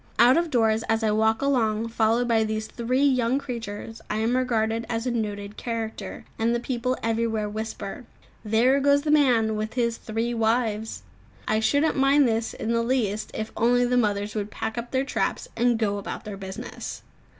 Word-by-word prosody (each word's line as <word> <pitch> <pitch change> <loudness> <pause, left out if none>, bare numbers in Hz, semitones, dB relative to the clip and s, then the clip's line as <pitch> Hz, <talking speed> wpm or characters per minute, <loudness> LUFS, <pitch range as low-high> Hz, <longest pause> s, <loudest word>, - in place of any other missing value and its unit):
Out 245 +2 +7
of 335 0 +1
doors, 225 -4 +2
as 225 0 +1
I 215 - +2
walk 220 +3 +2
along 230 -5 +1
followed 230 +1 +2
by 225 -2 +3
these 215 0 -2
three 250 +4 -1
young 255 -2 +3
creatures, 225 -4 -6
I - - -1
am 225 +3 +1
regarded 230 -3 0
as 230 0 -2
a 250 - 0
noted 210 -2 -3
character, 225 -2 -5
and 230 +1 +2
the - - 0
people 250 +1 -2
everywhere 225 -1 0
whisper, 220 +3 -5 0.4
"There 235 +5 +3
goes 285 +1 +3
the 305 - +1
young 300 -1 +6
man 225 -4 +2
with 215 +2 -4
his 235 -2 0
three 225 +2 -2
wives!" 220 - 0 0.4
I 215 - +2
shouldn't 285 +9 +2
mind 275 +1 +5
this 225 0 -1
in 225 - -3
the 230 0 +2
least 220 -4 0
if 220 0 -4
only 245 +2 +3
the 245 +1 +1
mothers 205 -3 +1
would 210 -1 -3
pack 220 - -4
up 240 0 -4
their 265 +1 0
traps - - -1
and 240 0 +2
go 205 -2 0
about 200 - -6
their 210 -2 -5
business. 190 -1 -7
230 Hz, 190 wpm, -25 LUFS, 220-245 Hz, 0.4 s, Out